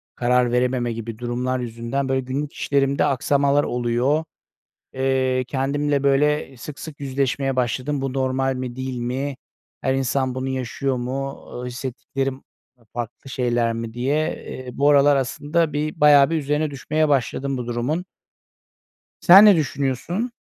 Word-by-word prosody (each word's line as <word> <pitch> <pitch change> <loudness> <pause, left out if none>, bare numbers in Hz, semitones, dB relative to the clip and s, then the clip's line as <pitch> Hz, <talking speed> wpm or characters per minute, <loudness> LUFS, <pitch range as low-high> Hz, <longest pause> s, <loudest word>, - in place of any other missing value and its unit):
karar 125 0 +2
verememe 125 -1 +1
gibi 115 -1 -6
durumlar 125 +1 -2
yüzünden 120 +3 -3
böyle 130 0 +1
günlük 140 +3 -4
işlerimde 140 -1 +1
aksamalar 140 +2 +2
oluyor. 125 +5 0 0.7
Eee, 130 -1 +1
kendimle 140 +1 0
böyle 140 0 +2
sık 140 +3 -9
sık 150 -1 -9
yüzleşmeye 135 0 -1
başladım. 130 +3 -1
Bu 135 -1 -2
normal 135 0 0
mi, 125 -1 -5
değil 130 -1 -4
mi? 130 +3 -3 0.4
Her 130 - 0
insan 130 0 0
bunu 130 +1 -3
yaşıyor 130 +1 -2
mu? 135 +3 -4
Iıı, 125 0 -5
hissettiklerim 135 +1 -4 0.4
ı 120 - -26
farklı 120 +3 -6
şeyler 120 -3 0
mi 115 0 -5
diye, 130 +4 0 0.3
eee, 130 -1 -7
bu 140 +3 +2
aralar 145 0 +5
aslında 150 +4 0
bir 150 +1 -3
bayağı 145 -1 +7
bir 165 - +1
üzerine 150 0 0
düşmeye 155 +3 0
başladım 135 0 0
bu 125 - -4
durumun. 125 +9 -2 1.2
Sen 195 +3 +9
ne 205 -2 +8
düşünüyorsun? 155 - -1
135 Hz, 145 wpm, -22 LUFS, 125-145 Hz, 1.2 s, Sen